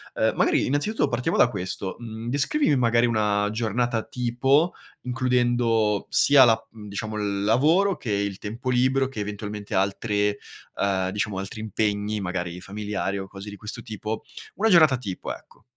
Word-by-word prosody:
Ehm, - - +1
magari, - - +2
innanzitutto, 145 +11 0
partiamo 145 +8 -1
da - - +6
questo: 95 -3 -4
mhmm, 115 0 -7
descrivimi, 145 - +2
magari, 120 -1 +3
una 105 -3 +1
giornata 115 +1 -1
tipo 135 +7 +1 0.3
includendo 120 -4 +1
sia 140 -2 +6
la 115 -2 +4
mhmm, 105 -2 -11
diciamo, 110 +2 -4
il 100 -1 -1
lavoro 160 - +3
che 115 - -5
il 100 -1 -1
tempo 115 +5 -5
libero 130 +2 +2
che 115 -6 -6
eventualmente 105 0 -6
altre 105 +1 0 0.4
ehm, 95 -2 0
diciamo, 105 -1 -2
altri 100 +3 -6
impegni, 105 0 -1
magari 90 -2 -4
familiari 100 0 -3
o 95 0 -5
cose 100 +2 -9
di 100 - -8
questo 110 +3 -6
tipo, 110 -1 -5 0.3
una 220 +2 +2
giornata 155 -8 +6
tipo, 100 -7 -5
ecco. - - -16
110 Hz, 155 wpm, -25 LUFS, 100-125 Hz, 0.4 s, da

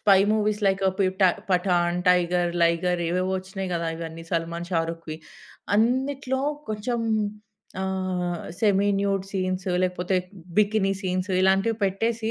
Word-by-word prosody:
Spy 195 -3 +6
movies 215 0 +1
like 195 0 +1 0.2
పి‌ఠా 190 0 +3 0.2
'Pathan', 180 -1 +2
'tiger', 175 -1 +3
'లైగర్' 170 +1 +2
ఏవేవో 185 +2 0
వచ్చినాయి 190 0 -6
గదా! 170 -1 -1
ఇవన్నీ 165 0 -7
'సల్మాన్', 170 +1 -2
'షారుఖ్‌వి'. 165 -1 -2 0.6
అన్నిట్లో 265 +3 +1 0.3
కొంచెం 225 +3 -2 0.8
ఆహ్, 185 -2 -2 0.2
సెమీ 205 -1 +3
న్యూడ్ 195 -1 0
సీన్స్ 185 -1 -2 0.2
లేకపోతే 180 0 0 0.4
బికిని 210 -2 +3
సీన్స్ 185 0 -2
ఇలాంటివి 195 +4 +3
పెట్టేసి, 220 +3 0
185 Hz, 115 wpm, -25 LUFS, 175-205 Hz, 0.8 s, Spy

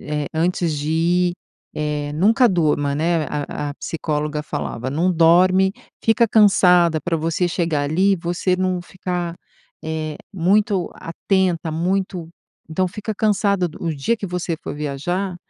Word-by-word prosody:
eh, 150 -1 -3
antes 170 -1 0
de 150 +2 -3
ir, 175 +2 +2 0.4
eh, 150 -1 -2
nunca 225 - +4
durma, 150 -5 +1
né, 165 +1 +1
a 145 0 -3
a - - -8
psicóloga 150 -2 -3
falava: 130 -3 -4
"Não 170 +6 +1
dorme, 185 +3 +4 0.3
fica 225 +1 +4
cansada 180 -6 +5
pra 165 +2 -1
você 165 +3 0
chegar 165 -4 -1
ali, 185 +7 +2
você 175 +2 -1
não 185 -1 0
ficar, 175 -2 -4 0.5
eh, 155 -1 -3 0.2
muito 195 +1 +1
atenta, 175 -1 -1
muito 180 0 -1 0.4
então, 185 +4 0
fica 210 +4 -5
cansada", 200 -3 +1
no 165 -3 -2
dia 145 +12 0
que 205 - -5
você 175 -2 -3
for - - -5
viajar 175 +6 -3
175 Hz, 140 wpm, -21 LUFS, 155-185 Hz, 0.5 s, cansada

